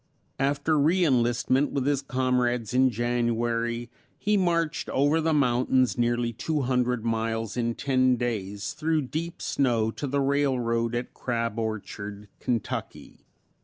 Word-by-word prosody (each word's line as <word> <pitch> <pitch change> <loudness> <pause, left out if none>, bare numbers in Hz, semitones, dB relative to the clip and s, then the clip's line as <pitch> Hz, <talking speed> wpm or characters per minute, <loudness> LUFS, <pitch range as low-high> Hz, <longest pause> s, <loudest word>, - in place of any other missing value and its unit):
After 145 +3 +1
re 170 +5 +3
enlistment 130 +1 +2
with 135 -2 -1
his 140 -1 +1
comrades 125 -3 0
in 130 +1 +5
January 120 0 -1 0.3
he 210 +1 +1
marched 170 -4 0
over 145 +4 +2
the 160 +1 +1
mountains 130 -2 +2
nearly 120 0 0
two 150 +6 -1
hundred 125 -2 0
miles 115 -1 -1
in 115 -1 -1
ten 130 -2 +2
days 110 0 -3
through 155 0 0
deep 160 +6 -5
snow 115 -5 +1
to 145 - -5
the 140 +2 0
railroad 125 -4 +1
at 120 +1 -4
Crab 115 -2 -2
Orchard, 105 -2 -5
Kentucky. 120 -4 -4
125 Hz, 130 wpm, -26 LUFS, 115-140 Hz, 0.3 s, in